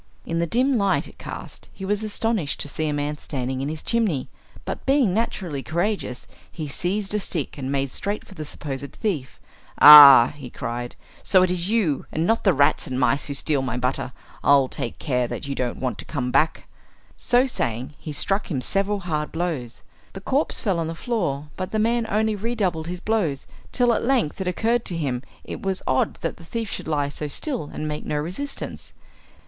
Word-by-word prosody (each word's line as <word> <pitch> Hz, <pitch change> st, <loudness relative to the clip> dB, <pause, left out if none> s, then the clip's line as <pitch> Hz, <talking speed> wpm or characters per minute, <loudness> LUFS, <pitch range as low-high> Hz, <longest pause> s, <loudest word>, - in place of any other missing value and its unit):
In 165 Hz, 0 st, -2 dB
the 170 Hz, -, 0 dB
dim 255 Hz, -, +2 dB
light 200 Hz, -1 st, +1 dB
it -, -, -16 dB
cast -, -, -8 dB
he 190 Hz, -, -7 dB
was 205 Hz, +2 st, -1 dB
astonished 215 Hz, -6 st, -1 dB
to -, -, -2 dB
see 155 Hz, +2 st, -2 dB
a -, -, 0 dB
man 145 Hz, +1 st, -2 dB
standing 130 Hz, -2 st, -3 dB
in 140 Hz, -, -2 dB
his 155 Hz, 0 st, -5 dB
chimney, 215 Hz, -, 0 dB, 0.4 s
but -, -, -5 dB
being 270 Hz, -8 st, +3 dB
naturally 185 Hz, -9 st, -2 dB
courageous 170 Hz, -4 st, -2 dB, 0.3 s
he 155 Hz, -3 st, -5 dB
seized 195 Hz, +7 st, -2 dB
a 210 Hz, -, +1 dB
stick 165 Hz, -7 st, -3 dB
and 135 Hz, -2 st, -4 dB
made 135 Hz, -1 st, -1 dB
straight 205 Hz, +8 st, -3 dB
for -, -, -14 dB
the 155 Hz, -5 st, -6 dB
supposed 140 Hz, -2 st, -6 dB
thief. 160 Hz, -, -3 dB, 0.4 s
"Ah!" 145 Hz, -5 st, +11 dB
he 135 Hz, -4 st, -9 dB
cried, 120 Hz, 0 st, -5 dB, 0.3 s
"so 185 Hz, -2 st, +4 dB
it 185 Hz, -, +2 dB
is 180 Hz, +1 st, -2 dB
you, 205 Hz, -11 st, +1 dB
and 160 Hz, +2 st, 0 dB
not 225 Hz, +4 st, +1 dB
the 195 Hz, -, +5 dB
rats 140 Hz, -3 st, +2 dB
and 130 Hz, 0 st, -3 dB
mice, 130 Hz, +2 st, +2 dB
who 140 Hz, -, -3 dB
steal 140 Hz, 0 st, +1 dB
my 125 Hz, -2 st, -2 dB
butter. 125 Hz, +1 st, -2 dB, 0.3 s
I'll 140 Hz, -2 st, +5 dB
take 120 Hz, -, -5 dB
care 125 Hz, -4 st, 0 dB
that 140 Hz, -, -6 dB
you 140 Hz, -, -2 dB
don't 125 Hz, -3 st, -2 dB
want 130 Hz, -2 st, -3 dB
to -, -, -7 dB
come 125 Hz, -5 st, -3 dB
back!" 160 Hz, +4 st, +1 dB, 0.5 s
So 245 Hz, +2 st, +3 dB
saying 125 Hz, -, -3 dB
he 155 Hz, -, -6 dB
struck 195 Hz, +7 st, 0 dB
him 145 Hz, -7 st, -1 dB
several 195 Hz, +8 st, 0 dB
hard 155 Hz, -4 st, -2 dB
blows. 160 Hz, -9 st, -3 dB, 0.3 s
The 195 Hz, -, -8 dB
corpse 275 Hz, +9 st, 0 dB
fell 195 Hz, -6 st, 0 dB
on 165 Hz, -, -1 dB
the 165 Hz, -, -4 dB
floor, 160 Hz, -, -2 dB
but 185 Hz, -1 st, -4 dB
the 220 Hz, -, -1 dB
man 230 Hz, +1 st, +1 dB
only 215 Hz, +1 st, +1 dB
redoubled 195 Hz, -7 st, -1 dB
his 180 Hz, 0 st, -5 dB
blows, 185 Hz, -11 st, -1 dB, 0.3 s
till 245 Hz, -1 st, +3 dB
at -, -, -1 dB
length 235 Hz, -, +1 dB
it 190 Hz, -, -2 dB
occurred 230 Hz, +6 st, +1 dB
to 175 Hz, -, -1 dB
him 130 Hz, -6 st, -2 dB, 0.2 s
it -, -, -7 dB
was 190 Hz, -1 st, -2 dB
odd 130 Hz, -, +1 dB
that -, -, -3 dB
the 170 Hz, -, -14 dB
thief 225 Hz, +5 st, -4 dB
should -, -, -5 dB
lie 145 Hz, -2 st, 0 dB
so 150 Hz, +1 st, -4 dB
still 235 Hz, -, -2 dB
and 155 Hz, -, -4 dB
make 150 Hz, 0 st, -4 dB
no -, -, -3 dB
resistance. 185 Hz, -, -5 dB
165 Hz, 205 wpm, -23 LUFS, 140-210 Hz, 0.5 s, Ah